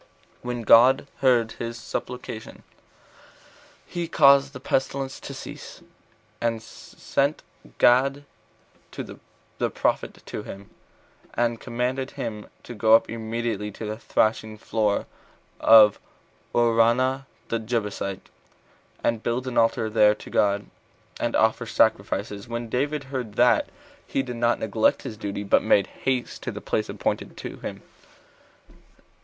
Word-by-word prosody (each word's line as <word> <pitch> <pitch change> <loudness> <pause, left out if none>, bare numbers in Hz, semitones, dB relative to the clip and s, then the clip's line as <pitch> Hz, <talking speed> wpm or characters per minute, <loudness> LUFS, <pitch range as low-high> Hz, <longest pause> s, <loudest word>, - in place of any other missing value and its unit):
4. - - -10
When 120 -1 -2
God 125 +5 +6
heard 120 -4 +3
his 115 0 -4
supplication, 115 0 -6 1.2
he 175 -1 -4
caused 140 -3 +5
the - - -9
pestilence 135 0 -2
to - - -8
cease, - - -9 0.6
and 115 -1 0
sent 140 +5 -3 0.3
Gad 135 +3 +4 0.7
the - - -6
prophet - - -1
to - - -5
him, 100 0 -10 0.6
and 120 -1 0
commanded 125 +2 -2
him 105 -3 -5 0.2
to 120 - -8
go 110 0 +5
up 115 - +2
immediately 115 -2 -3
to 110 - -7
the 105 0 -3
thrashing 110 -1 0
floor 105 -1 0 0.5
of 110 -2 +7 0.6
Araunah 120 +3 +3 0.2
the 115 - 0
Jebusite, 105 -4 -3 0.8
and 115 -2 +1
build 120 +3 -2
an 130 -2 -4
altar 115 -1 +2
there 105 -1 +4
to - - -12
God, 100 0 +2 0.5
and - - -1
offer - - +2
sacrifices. 100 -1 0
When 120 0 -4
David 145 +4 -1
heard 130 -6 -5
that, 125 - +4 0.4
he 135 - -1
did 125 -2 -6
not 120 0 +2
neglect 110 0 +1
his 125 -5 -6
duty, 100 -1 -4
but 100 - +3
made 100 - +3
haste 130 +2 -3
to - - -4
the - - -7
place - - -2
appointed - - -3
him. - - -7
115 Hz, 125 wpm, -25 LUFS, 110-130 Hz, 1.2 s, of